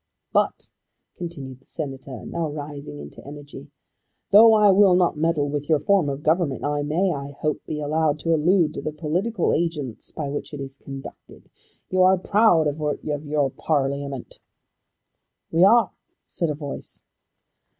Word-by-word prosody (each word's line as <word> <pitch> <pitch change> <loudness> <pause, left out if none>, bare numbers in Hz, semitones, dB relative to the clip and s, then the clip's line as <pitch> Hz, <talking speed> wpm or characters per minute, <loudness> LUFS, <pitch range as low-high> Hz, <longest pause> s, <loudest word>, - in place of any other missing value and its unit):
"But," - - +1 0.5
continued 140 -7 -7
the - - -27
Senator, 135 -5 -6
now 170 -2 -3
rising 145 - -7
into 75 0 -11
energy, 145 0 -10 0.6
"tho' 220 +3 +9
I 210 -2 +6
will 195 -1 +6
not 180 -2 +2
meddle 155 -1 +1
with 145 +1 -4
your 155 - +5
form 185 -1 +2
of 140 +1 -5
government, 160 -3 +1
I 145 0 0
may, 165 +6 +1
I 140 0 -6
hope, 150 -1 -2
be 150 - -3
allowed 150 0 +1
to 165 - +1
allude 165 0 +3
to - - -5
the 155 - -4
political 175 +7 -1
agents 150 -8 -2
by 150 - -5
which 145 +1 -5
it - - -8
is 135 0 -7
conducted. 135 -1 -11 0.4
You 185 0 +2
are 185 +1 +6
proud 195 -3 +3
of 150 +1 -1 0.2
your 145 -2 -1
Parliament." 140 -3 -2 1.1
"We 165 +2 +4
are," 230 +5 +5 0.3
said 170 -3 -2
a 150 - -2
voice. 145 -2 -7
150 Hz, 155 wpm, -23 LUFS, 140-175 Hz, 1.1 s, tho